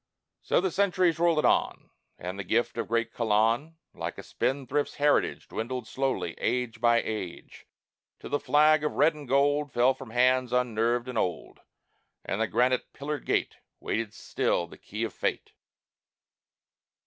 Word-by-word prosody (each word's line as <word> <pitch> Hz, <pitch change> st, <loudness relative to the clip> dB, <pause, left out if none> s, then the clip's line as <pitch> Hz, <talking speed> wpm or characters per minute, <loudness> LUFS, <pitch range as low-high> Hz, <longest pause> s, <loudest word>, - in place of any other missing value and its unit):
So -, -, +2 dB
the 185 Hz, 0 st, 0 dB
centuries 185 Hz, -4 st, +2 dB
rollèd 165 Hz, -2 st, +3 dB
on, -, -, +1 dB, 0.3 s
And 90 Hz, +3 st, -6 dB
the -, -, -3 dB
gift 115 Hz, +6 st, 0 dB
of -, -, -2 dB
great 115 Hz, 0 st, -1 dB
Colon, 115 Hz, +8 st, +1 dB, 0.2 s
Like -, -, -5 dB
a -, -, -8 dB
spendthrift's 140 Hz, +2 st, -1 dB
heritage, 145 Hz, 0 st, +1 dB
Dwindled 120 Hz, +1 st, -4 dB
slowly, 135 Hz, 0 st, -2 dB
age 120 Hz, -1 st, -1 dB
by 120 Hz, -1 st, +4 dB
age, 100 Hz, -6 st, -6 dB, 0.5 s
Till -, -, -9 dB
the 145 Hz, -, +1 dB
flag 150 Hz, +2 st, +4 dB
of 150 Hz, -, -1 dB
red 150 Hz, +4 st, +4 dB
and 150 Hz, -2 st, -10 dB
gold 145 Hz, +2 st, +2 dB
Fell 125 Hz, +2 st, +3 dB
from 130 Hz, -, -11 dB
hands 125 Hz, +1 st, +2 dB
unnerved 120 Hz, 0 st, +1 dB
and 125 Hz, -3 st, -2 dB
old, 90 Hz, -3 st, -3 dB, 0.7 s
And 100 Hz, -, -2 dB
the 115 Hz, -, +2 dB
granite 125 Hz, +3 st, +1 dB
pillared 145 Hz, +1 st, -5 dB
gate -, -, 0 dB, 0.2 s
Waited 115 Hz, -2 st, -2 dB
still 85 Hz, -, -1 dB
the 85 Hz, -, -15 dB
key -, -, -5 dB
of -, -, -3 dB
fate. -, -, -3 dB
125 Hz, 155 wpm, -28 LUFS, 115-145 Hz, 0.7 s, by